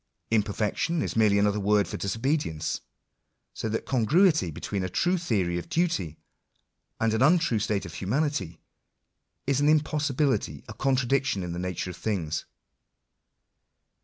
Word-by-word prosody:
Imperfection 110 - 0
is - - -3
merely 105 -2 +4
another 105 +1 +2
word 105 0 +2
for - - -5
disobedience. 115 - -1 0.7
So 110 - -3
that 110 - -2
congruity 150 - +3
between 85 +5 -4
a 95 - -2
true 175 - +1
theory 100 - 0
of - - -10
duty, 165 - 0 0.8
and 115 -1 +2
an 110 - 0
untrue 160 -5 +4
state 105 -2 -1
of 85 - -8
humanity, 100 - -1 0.9
is 140 0 +1
an 145 - +4
impossibility, 150 -2 +1
a 110 - -7
contradiction 135 -4 +1
in 90 - -4
the 85 - -4
nature 90 0 -3
of 90 - -11
things. 85 -8 -2
110 Hz, 135 wpm, -27 LUFS, 95-145 Hz, 0.9 s, merely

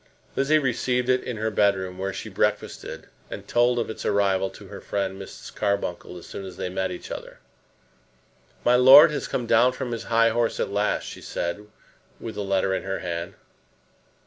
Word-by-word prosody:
Lizzie 145 +3 +3
received 125 -2 0
it 130 0 +2
in 125 - -5
her 110 +1 -1
bedroom, 95 -3 +1
where 95 +1 -2
she - - -6
breakfasted, - - -2 0.2
and - - -8
told 120 +1 +3
of 120 - 0
its 110 - -7
arrival 95 -2 +1
to - - -13
her - - -10
friend 100 -1 -3
Mrs. - - -10
Carbuncle 100 -4 -2
as 85 - -11
soon 100 - -7
as 95 -2 -9
they 95 -1 -3
met 95 +1 -2
each 90 - -8
other. - - -7 1.3
"My 120 - +5
lord 135 +6 +9
has 150 - -3
come 125 - -2
down 120 +3 +4
from 125 -1 -5
his 115 -1 -4
high 115 0 +4
horse 115 0 0
at - - -1
last," 105 +1 0
she - - -8
said, 100 +5 -4 0.5
with 115 - -6
the 105 - -4
letter 95 -1 +1
in - - -1
her 95 0 -3
hand. 85 +1 -4
105 Hz, 190 wpm, -25 LUFS, 95-120 Hz, 1.3 s, lord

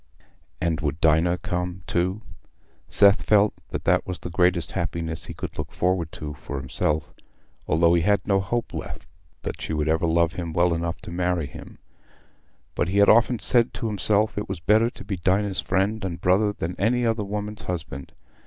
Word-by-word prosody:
And 85 -2 -1
would 75 0 -2
Dinah 80 +3 +3
come 90 -2 -4
too? 90 +4 -1 0.7
Seth 100 0 +6
felt 105 0 +3 0.2
that - - -4
that - - +2
was 90 -1 -4
the 85 - -8
greatest 90 -1 +2
happiness 80 -1 -2
he - - -7
could - - -6
look - - -4
forward 90 -3 0
to 75 -1 -6
for 70 0 -7
himself, 75 +3 -2 0.5
though 85 +2 +3
he 85 - +3
had 100 +4 +2
no 100 -2 +2
hope 115 +5 -2
left 80 - -6 0.4
that - - -5
she - - -4
would 75 -1 -1
ever 80 +1 +1
love 85 0 +2
him 85 -2 -5
well 85 +1 +3
enough 85 0 -3
to - - -9
marry 90 -2 0
him; 70 - -11 1.0
but - - 0
he 95 +3 -1
had 100 - +6
often 120 +2 +5
said 120 +1 +3
to 120 - -4
himself, 105 0 +1
it 105 - -6
was 95 -3 -4
better 110 +7 +3
to - - -11
be 95 -1 -4
Dinah's 95 +3 +1
friend 100 +3 0
and 85 -3 -4
brother 100 +4 +3
than 90 -3 -5
any 120 +5 +2
other 115 -2 0
woman's 105 +1 -4
husband. 75 -6 -5
90 Hz, 190 wpm, -24 LUFS, 85-105 Hz, 1.0 s, Seth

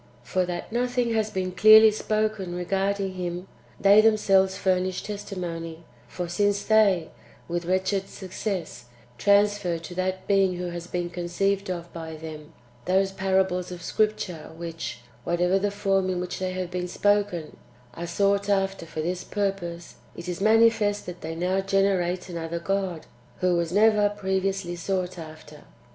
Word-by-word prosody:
For 180 +9 0
that 175 +2 -5
nothing 245 0 0
has 220 -1 +1
been 185 -2 -2
clearly 215 +3 +8
spoken 215 -4 -1
regarding 195 +2 -1
Him, 180 0 -4 0.3
they 200 +2 +7
themselves 195 -3 +3
furnish 185 -1 0
testimony; 170 -5 -6 0.2
for 180 -1 -5
since 200 +3 +1
they, 200 -6 +3 0.4
with 175 0 -3
wretched 190 +2 0
success, 185 - -5 0.3
transfer 205 -1 +3
to 170 +2 -9
that 185 +1 -2
Being 195 -2 +3
who 180 0 -4
has 170 0 -6
been 175 -1 -3
conceived 190 +3 -1
of 175 -1 -5
by 160 -1 -6
them, 155 0 -9 0.3
those 190 +1 +2
parables 190 -1 0
[of 175 -1 -8
Scripture] 205 -7 -1
which, 165 -7 -6 0.2
whatever 180 +4 +1
the 205 +1 0
form 195 -2 0
in 180 -1 -1
which 180 0 -4
they 185 0 -2
have 185 -1 -4
been 180 0 -2
spoken, 205 -3 0 0.4
are 170 +7 -6
sought 200 +3 +1
after 195 -3 0
[for 155 - -4
this 180 +2 -2
purpose], 185 -4 -3 0.2
it 170 - -8
is 180 +1 -4
manifest 220 -1 +3
that 180 -1 -8
they 160 +1 -5
now 180 +3 0
generate 190 -2 +1
another 170 -1 -4
[God], 185 -1 -2 0.3
who 180 -1 +2
was 170 -1 -1
never 210 +1 +4
previously 190 -2 -2
sought 185 0 -2
after. 155 -2 -11
185 Hz, 150 wpm, -26 LUFS, 175-200 Hz, 0.4 s, clearly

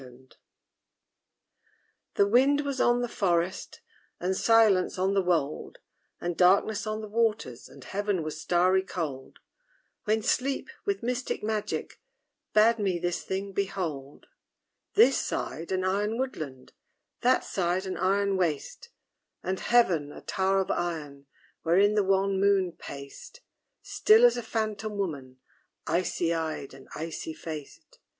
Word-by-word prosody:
WHICH? 130 +1 -16 1.8
The 200 - +4
wind 270 +6 +4
was 280 -2 -2
on 240 0 +3
the 245 - -1
forest, 180 -4 -1 0.4
And 185 +2 -1
silence 215 -5 +4
on 190 +2 +1
the 195 - +3
wold; 165 -5 -1 0.4
And 175 0 -3
darkness 200 +4 +3
on 215 0 -2
the 215 - -7
waters, 210 - -1
And 140 - -14
heaven 200 -1 -2
was 155 0 -5
starry 185 +2 +3
cold; 155 -8 -5 0.7
When 215 0 +1
Sleep, 270 +4 0
with 400 - -1
mystic 250 -1 -2
magic, 215 -1 -3 0.5
Bade 225 +2 +4
me 190 -4 0
this 175 0 -2
thing 195 +1 -4
behold: 165 -8 -4 0.7
This 455 - +6
side, 165 +3 -4
an 185 0 0
iron 205 +4 0
woodland; 155 - -5 0.5
That 255 +1 +3
side, 185 0 -1
an 190 - -3
iron 195 +1 +1
waste; 180 - -2 0.5
And 190 +1 -2
heaven, 175 -12 +2
a - - -11
tower 195 0 +1
of 190 - -2
iron, 150 -5 -4 0.3
Wherein 195 +5 +3
the 210 -1 +2
wan 195 0 +1
moon 195 -2 +3
paced, 140 - -10 0.4
Still 445 +3 +5
as 485 - +5
a 240 - -3
phantom 215 -2 -3
woman, 140 -10 -4 0.5
Ice 175 +3 -1
eyed 160 -4 -2
and 135 - -14
icy 160 0 -5
faced. 155 -3 -9
190 Hz, 135 wpm, -28 LUFS, 165-215 Hz, 1.8 s, This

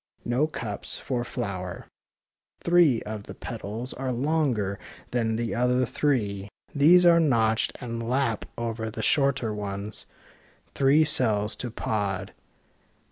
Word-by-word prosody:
No 125 +6 +1
cups 110 -9 -3
for 125 -2 -2
flower— 100 -7 -5 0.8
three 170 -8 +4
of 105 -1 -6
the - - -9
petals 115 +2 -5
are 130 0 -3
longer 125 -7 0 0.3
than 115 -2 0
the 115 0 -2
other 125 +1 +2
three. 105 -7 -1 0.2
These 170 +5 +6
are 170 -1 +7
notched 115 -7 +2
and 115 -2 -5
lap 125 -4 0
over 115 -1 -3
the 110 - -5
shorter 135 -6 +2
ones. 100 0 -5 0.7
Three 140 +3 +4
cells 110 -8 +3
to 125 - -4
pod. 100 -4 -2
120 Hz, 125 wpm, -26 LUFS, 105-135 Hz, 0.8 s, are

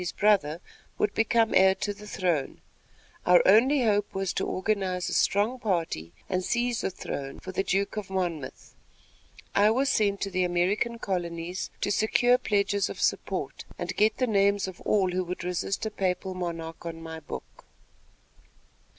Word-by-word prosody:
his 180 - -3
brother, 185 -6 +2 0.4
would 210 - +1
become 225 0 +2
heir 190 0 +6
to 205 - -2
the 210 +1 -12
throne. 175 -8 -1 0.6
Our 180 0 +6
only 250 +7 +5
hope 205 -3 +1
was 195 -1 -1
to - - -1
organize 185 -2 -1
a - - -3
strong 215 +6 +2
party 165 - -2 0.2
and 185 -1 -1
seize 240 +3 0
the - - -1
throne 140 -6 -6
for 185 - -7
the 190 - 0
Duke 195 +2 -1
of 205 -2 -4
Monmouth. 175 -7 -4 0.8
I 205 +1 +5
was 265 +5 +2
sent 200 -2 +2
to 195 - -2
the 185 0 +1
American 185 +7 0
colonies 175 -3 -3
to 205 - 0
secure 245 +4 +3
pledges 200 -1 +1
of - - -7
support, - - -1
and - - -4
get 215 +1 +3
the 255 - +2
names 200 -3 +2
of 185 -2 -9
all 190 -3 +2
who 185 +1 0
would 180 0 -5
resist 180 +4 -2
a 220 - -2
papal 190 -1 -1
monarch 165 -2 -5
on 165 -1 -6
my 160 0 -7
book. 155 - -9
195 Hz, 165 wpm, -27 LUFS, 180-210 Hz, 0.8 s, heir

